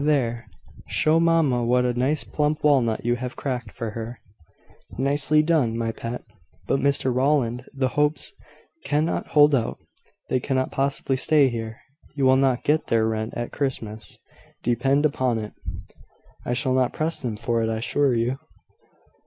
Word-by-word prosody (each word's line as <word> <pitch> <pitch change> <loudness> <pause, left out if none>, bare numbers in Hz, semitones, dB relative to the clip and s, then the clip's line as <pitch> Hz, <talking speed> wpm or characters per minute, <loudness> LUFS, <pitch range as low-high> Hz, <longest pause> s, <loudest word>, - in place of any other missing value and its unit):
There! 125 -6 0 0.4
show 155 +1 +3
mamma 165 -7 +3
what 125 +1 +2
a 125 - +1
nice 130 +5 0
plump 150 0 -1
walnut 125 -7 +2
you 120 0 +2
have 125 0 -5
cracked 125 -5 -4
for 115 -3 -5
her." 115 +2 -6 0.8
"Nicely 145 +3 +2
done, 150 -9 +2
my 115 -1 -1
pet. 115 +2 -6 0.4
But, 135 - +1
Mr 140 -2 +2
Rowland, 130 -2 +1
the 135 -2 0
Hopes 150 - 0 0.5
cannot 150 +3 0
hold 150 -1 +5
out. 120 -4 0 0.5
They 130 - +1
cannot 130 0 -1
possibly 135 -1 0
stay 145 0 +4
here. 115 -1 -5 0.3
You 140 -2 +1
will 130 0 +6
not 130 -2 +2
get 155 +2 +1
their 110 -1 +2
rent 110 0 -3
at 120 0 -4
Christmas, 110 -6 -3 0.5
depend 135 +5 +2
upon 130 -5 +1
it." 105 -1 -5 0.9
"I 125 - -1
shall 130 +1 0
not 130 -1 +2
press 160 +2 -2
them 115 -5 -3
for 115 +1 0
it, 110 - 0
I 110 - -1
assure 135 +3 +1
you." 120 +3 0
130 Hz, 160 wpm, -24 LUFS, 115-145 Hz, 0.9 s, will